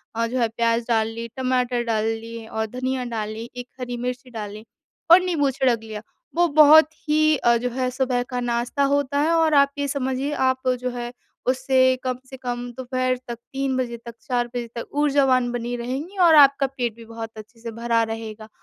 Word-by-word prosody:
अ, 230 0 0
जो 250 +2 -2
है 235 - +3
प्याज़ 230 0 0
डाल 225 -2 +2
ली, 230 +1 -6
टमाटर 250 -2 0
डाल 220 -2 0
ली 225 0 -4
और 220 0 -3
धनिया 260 0 -1
डाल 215 -1 -2
ली, 225 +2 -7
एक 245 0 -7
हरी 245 -1 -4
मिर्ची 250 +1 -4
डाली 215 -1 -7 0.5
और 360 - +9
नींबू 325 -7 +1
छिड़क 255 -3 +1
लिया। 215 -1 -7 0.3
वो 345 0 +4
बहुत 310 +1 +7 0.2
ही 310 0 +4
अ, 235 -1 +3
जो 250 +2 -2
है 255 +1 -1
सुबह 255 -1 0
का 250 -1 -2
नाश्ता 240 +3 -1
होता 285 0 +1
है 315 +2 +2
और 325 -1 +3
आप 280 -1 +5
ये 285 0 -1
समझिए, 270 0 -2
आप 260 -2 0
जो 250 0 -2
है 240 0 -5 0.4
उससे 260 0 +3
कम 255 -1 -2
से 265 - -9
कम 245 -1 -4
दोपहर 255 0 -1
तक, 235 -1 -5 0.2
3:00 270 -1 -1
बजे 240 -2 -2
तक, 235 0 -10
4:00 240 0 -1
बजे 240 0 -5
तक 235 - -4 0.2
ऊर्जावान 270 -4 +3
बनी 240 0 -3
रहेंगी 270 +11 -5
और 325 -2 +7
आपका 280 -1 +6
पेट 245 -4 -3
भी 230 0 -13
बहुत 225 0 -7
अच्छे 220 +2 -12
से 230 0 -6
भरा 230 0 0
रहेगा। 220 -1 -7
250 Hz, 205 wpm, -23 LUFS, 230-270 Hz, 0.5 s, और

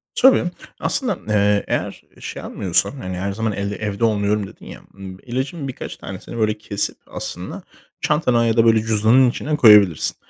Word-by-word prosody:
Tabii, 265 -5 +5 0.4
aslında, 245 -9 -1
eee, 105 -1 +2
eğer - - -3 0.2
şey - - -7
almıyorsan, 90 +3 0
hani, 95 -10 -6
her 100 +2 -2
zaman 110 +2 -2
el 100 +1 -3
evde 105 +1 -4
olmuyorum 105 -1 0
dedin - - -15
ya, - - -10
ımm, 95 -1 -9
ilacın 135 +4 -4
birkaç 130 - -7
tanesini 95 +5 -8
böyle 110 -1 +1
kesip 105 -1 -3
aslında - - -7 0.4
çantana 125 -6 +2
ya 115 0 +1
da, 115 - +5
böyle, 115 -1 +5
cüzdanın 110 +4 +4
içine 150 +5 -2
koyabilirsin. 105 - +5
110 Hz, 165 wpm, -20 LUFS, 100-125 Hz, 0.4 s, Tabii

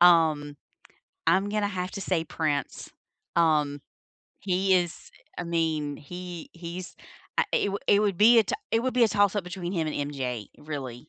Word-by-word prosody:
Um, 160 -4 +5 0.7
I'm 190 +5 +3
gonna 210 -1 0
have 185 -2 -3
to 195 - -5
say 175 -4 0
Prince. 150 -3 -2 0.5
Um, 150 -4 +2 0.6
he 190 0 +2
is, 175 -2 -1 0.3
I 175 - -3
mean, 160 -4 -1
he 175 +2 -8
he's, 175 +2 -7 0.4
uh, - - +5
it 200 - +2
would 200 - -4
it 200 - +5
would 200 -4 +1
be 230 +2 +8
a 220 - +1
t - - -1 0.2
it 225 - +2
would 260 +1 0
be 245 - +6
a - - +3
toss-up 205 -2 +2
between 180 0 -5
him 165 -4 0
and - - -3 0.2
MJ 125 -6 -3
really, 135 -5 -6
175 Hz, 175 wpm, -27 LUFS, 155-195 Hz, 0.7 s, be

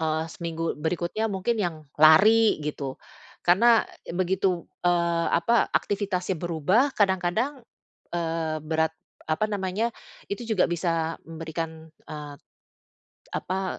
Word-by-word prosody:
eee, 160 0 0
seminggu 165 -1 -3
berikutnya 175 +7 -1
mungkin 200 +4 -1
yang 160 -5 -3 0.2
lari 210 +9 +7
gitu, 140 -3 -4 0.5
karena 225 +6 +5 0.3
begitu, 185 0 0 0.2
eee, 170 -1 +2
apa, 230 +8 +3
aktivitasnya 195 -2 -1
berubah, 175 - +2
kadang-kadang, 205 +8 +1 0.5
eee, 165 -2 -2
berat 160 0 +1 0.4
apa 215 +7 +1
namanya, 205 +3 -2 0.3
itu 200 +4 -4
juga 220 -4 +2
bisa 165 -1 -1
memberikan, 160 0 -6 0.2
eee, 150 -1 -7 1.0
apa, 190 0 -3
175 Hz, 105 wpm, -26 LUFS, 160-200 Hz, 1.0 s, lari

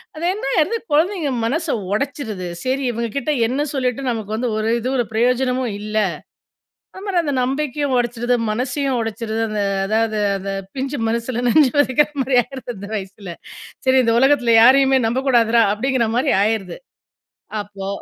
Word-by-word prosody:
அது 320 - -7
என்னாயிருது 350 +3 0
குழந்தைங்க 320 -1 +1
மனச 320 +7 -1 0.3
உடைச்சுருது. 220 -7 -3 0.2
"சரி, 265 +1 -1
இவங்க 235 0 -3
கிட்ட 295 +3 0
என்ன 275 +5 -1
சொல்லிட்டு, 255 -1 -1
நமக்கு 220 -2 -4
வந்து 240 +1 -1
ஒரு 220 - -1
இது, 250 +3 -3
ஒரு 240 - +1
ப்ரயோஜனமும் 250 +1 +1
இல்ல." 215 +1 -6 1.0
அந்த 380 - -10
மாரி 370 -3 +1
அந்த 285 -2 -1
நம்பிக்கயும் 275 0 -1
உடைச்சுருது, 240 0 0
மனசையும் 260 +3 -1
உடைச்சுருது. 225 0 -3
அந்த 210 -1 -2 0.3
அதாவது 220 0 0 0.2
அந்த 195 +1 -5 0.2
பிஞ்சு 270 0 -3
மனசுல 235 +1 -2
நஞ்ச 300 +1 +5
வதைக்கிற 290 +1 +3
மாரி 255 -1 +1
ஆயிருது 260 -2 -8
அந்த 200 +2 -8
வயசுல. 195 -3 -7 0.5
"சரி, 260 0 +4
இந்த 230 0 +2
உலகத்துல 255 -4 +4
யாரையுமே 265 +1 +5
நம்பக்கூடாதுரா" 235 -2 +3
அப்டிங்ற 245 +1 0
மாரி 270 +2 +2
ஆயிருது. 215 -3 -1 0.9
அப்போ 195 -1 -8
250 Hz, 145 wpm, -20 LUFS, 225-275 Hz, 1.0 s, நஞ்ச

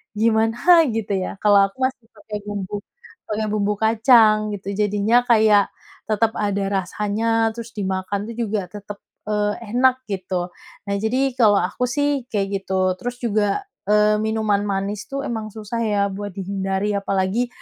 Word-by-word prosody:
gimana 225 +10 +4
gitu 220 -2 -2
ya. 190 +1 -3
Kalau 205 -1 +6
aku 195 - -21
masih 260 -3 -1
pakai 210 -1 -7
bumbu 205 0 -4 0.5
pakai 215 0 -2
bumbu 210 0 +1
kacang 220 -1 +4
gitu, 200 0 -6
jadinya 210 +4 +2
kayak 215 -4 +4 0.4
tetap 220 +1 +1
ada 200 -1 -1 0.2
rasanya, 225 +4 0
terus 230 -1 -8
dimakan 195 +1 -3
tuh 230 - -7
juga 215 -5 -2
tetap, 205 +2 -9 0.3
eee, 210 0 0 0.2
enak 260 +1 +3
gitu. 185 -2 -3 0.4
Nah 200 - 0
jadi 255 +5 +1
kalau 215 -3 +6
aku 250 +7 -1
sih 285 0 -1
kayak 200 -2 -1 0.2
gitu. 185 -1 0
Terus 245 0 -4
juga 210 -2 +1 0.4
eee, 210 0 +4
minuman 220 -2 0
manis 200 +1 -3
tuh 275 0 -3
emang 220 -2 -4
susah 220 +2 -5
ya 210 -2 +1
buat 205 +1 -5
dihindari, 195 +1 -2
apalagi, 195 +4 0
210 Hz, 150 wpm, -21 LUFS, 200-225 Hz, 0.5 s, Kalau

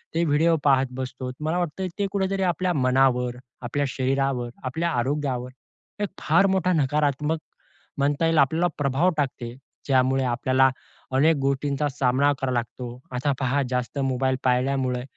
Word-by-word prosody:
ते 165 - +2
व्हिडिओ 160 +2 +3
पाहत 135 -2 +4
बसतो. 130 -1 -5
मला 155 +3 -1
वाटतं 180 +2 -2
ते 200 - +1
कुठेतरी 195 -1 0
आपल्या 180 0 0
मनावर, 130 -3 +2 0.2
आपल्या 135 +4 -1
शरीरावर, 135 -2 -1
आपल्या 160 +7 -1
आरोग्यावर 130 -1 -1 0.5
एक 205 - -1
फार 195 - +3
मोठा 190 -2 +1
नकारात्मक 150 +1 +1 0.6
म्हणता 145 +3 +1
येईल, 165 0 +2
आपल्याला 160 +5 +3
प्रभाव 145 +5 +2
टाकते, 125 -4 -3 0.3
ज्यामुळे 130 0 +2
आपल्याला 130 +2 +3 0.5
अनेक 155 +4 +4
गोष्टींचा 140 +1 0
सामना 135 +1 +2
करावा 130 -1 0
लागतो. 120 +1 -4
आता 130 +3 0
पहा, 135 +1 +1
जास्त 125 +2 -2
मोबाईल 130 -1 +1
पाळल्यामुळे 125 0 +1
135 Hz, 140 wpm, -24 LUFS, 130-150 Hz, 0.6 s, पाहत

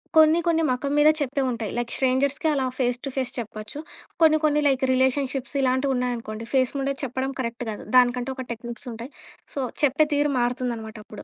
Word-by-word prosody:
కొన్ని 315 +1 +6
కొన్ని 325 -1 +2
మొఖం 265 +3 -1
మీదే 300 +1 +7
చెప్పేవుంటాయి. 255 -6 -1
లైక్ 240 -1 -2
స్ట్రేంజర్స్‌కే 275 +4 +1
అలా 270 -2 0 0.2
ఫేస్ 245 -1 +1
టు - - -2
ఫేస్ 260 -2 -1
చెప్పొచ్చు. 220 +3 -6 0.4
కొన్ని 310 -1 +6
కొన్ని 300 -1 +3
లైక్ 265 -1 +1
రిలేషన్‌షిప్స్ 265 +1 0
ఇలాంటివున్నాయనుకోండి 250 -4 -1
ఫేస్ 255 -1 +3
మీదే 275 0 0
చెప్పడం 260 +1 -2
కరెక్ట్ 235 0 -3
కాదు. 210 - -6
దానికంటూ 250 +1 +4
ఒక 260 - -5
టెక్నిక్స్ 235 +3 -7
ఉంటాయి. 235 +5 -8 0.4
సో, 280 - -4 0.2
చెప్పే 290 +2 +4
తీరు 290 0 +2
మారుతుందనమాటప్పుడు, 230 -4 -3
260 Hz, 160 wpm, -24 LUFS, 240-280 Hz, 0.4 s, మీదే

